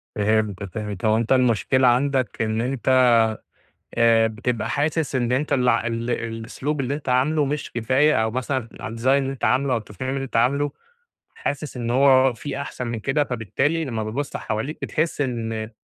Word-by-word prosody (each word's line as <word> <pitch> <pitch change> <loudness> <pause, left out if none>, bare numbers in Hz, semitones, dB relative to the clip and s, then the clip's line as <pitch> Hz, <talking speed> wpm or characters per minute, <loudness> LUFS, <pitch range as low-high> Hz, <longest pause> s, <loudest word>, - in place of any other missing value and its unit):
فهمت، 105 -2 0
فهمت 100 0 -5
هو 110 0 +4
أنت 115 +2 -2
المشكلة 130 +1 +3
عندك 130 -1 +1
إن 110 0 0
أنت 130 0 +3 0.8
آآ 115 -1 +4
بتبقى 110 0 -2
حاسس 150 -1 -1
إن 120 -1 0
أنت 145 +4 0
ال 125 -2 +2
ال 115 0 0
الأسلوب 115 +6 -3
اللي 135 +1 -1
أنت 145 -2 -7
عامله 140 +5 +2
مش 145 +1 -3
كفاية 130 +3 +2
أو 110 - 0
مثلًا 130 0 -2
الdesign 115 +3 -6
اللي 135 0 +3
أنت 135 - -5
عامله 130 +1 +2
أو 120 - +2
التصميم 110 +4 -6
اللي 135 -1 -2
أنت 135 - -4
عامله 140 +5 +2 0.6
حاسس 145 -1 -4
إن 120 -1 -3
هو 130 0 +5
في 140 +4 -5
أحسن 130 -3 -5
من 115 -1 -3
كده، 140 +6 +1
فبالتالي 135 - -1
لمّا 115 -5 -3
بتبص 135 +7 -3
حواليك 125 +9 -4
بتحس 155 -1 -1
إن 115 -4 -2
125 Hz, 170 wpm, -23 LUFS, 115-140 Hz, 0.8 s, هو